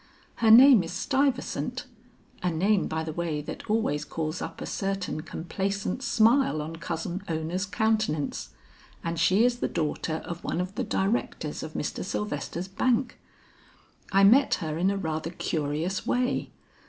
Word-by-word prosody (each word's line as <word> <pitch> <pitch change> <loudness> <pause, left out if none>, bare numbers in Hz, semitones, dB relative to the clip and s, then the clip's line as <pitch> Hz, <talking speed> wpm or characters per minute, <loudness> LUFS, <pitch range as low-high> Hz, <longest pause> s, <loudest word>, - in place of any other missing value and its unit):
Her 225 - +3
name 250 0 +9
is 165 -1 -6
Stuyvesant 265 +5 -1 0.6
a 180 - +1
name 190 +4 +2
by 160 0 -2
the 160 -1 -5
way 165 -2 -2
that 210 - -8
always 210 -10 +1
calls 160 +2 -4
up - - -6
a - - -5
certain 195 -5 -2
complacent 195 +6 -3
smile 230 - +3
on 160 +2 -5
Cousin 170 +2 -4
Ona's 165 +5 -2
countenance 185 - 0 0.5
and 165 -1 -2
she 200 +6 +4
is 245 -1 +1
the - - 0
daughter 160 0 -2
of 170 0 -6
one - - -2
of 180 +1 -3
the 255 +4 -2
directors 205 +1 -1
of - - -7
Mr. - - -3
Sylvester's 175 -2 -3
bank. 240 +6 0 0.9
I 195 0 +5
met 255 +8 +6
her 155 -2 -4
in 185 +2 +3
a 200 - 0
rather 160 -3 -3
curious 160 +2 -2
way. 250 +1 0
185 Hz, 155 wpm, -27 LUFS, 160-220 Hz, 0.9 s, name